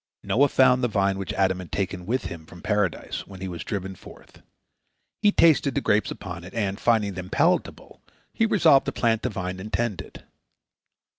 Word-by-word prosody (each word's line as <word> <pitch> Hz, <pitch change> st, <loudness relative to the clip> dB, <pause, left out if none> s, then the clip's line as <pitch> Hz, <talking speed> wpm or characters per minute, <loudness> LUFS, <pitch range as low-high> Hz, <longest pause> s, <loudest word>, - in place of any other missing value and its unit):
Noah 140 Hz, +5 st, +3 dB
found 130 Hz, -2 st, +4 dB
the -, -, +3 dB
vine 100 Hz, -3 st, 0 dB
which 95 Hz, -, -4 dB
Adam 95 Hz, -1 st, +1 dB
had 90 Hz, -, -9 dB
taken 95 Hz, -2 st, -3 dB
with 130 Hz, +4 st, -1 dB
him 80 Hz, -2 st, -8 dB
from 85 Hz, -, -14 dB
Paradise, 105 Hz, -5 st, -1 dB
when 95 Hz, -1 st, -11 dB
he 95 Hz, -, -5 dB
was 85 Hz, -2 st, -6 dB
driven 95 Hz, -3 st, -4 dB
forth. -, -, -16 dB, 0.8 s
He 210 Hz, -1 st, +5 dB
tasted 150 Hz, -, +4 dB
the -, -, +1 dB
grapes 105 Hz, +1 st, +1 dB
upon 90 Hz, -3 st, -7 dB
it, 90 Hz, -, -11 dB
and, 100 Hz, -2 st, -1 dB
finding 110 Hz, -4 st, +2 dB
them 95 Hz, 0 st, -7 dB
palatable, -, -, 0 dB, 0.3 s
he 225 Hz, -, +2 dB
resolved 160 Hz, -10 st, +4 dB
to -, -, 0 dB
plant 115 Hz, -2 st, +1 dB
the 125 Hz, -, -1 dB
vine 95 Hz, -3 st, -5 dB
and 105 Hz, +3 st, -8 dB
tend 115 Hz, -6 st, -1 dB
it. -, -, -13 dB
100 Hz, 195 wpm, -25 LUFS, 95-120 Hz, 0.8 s, He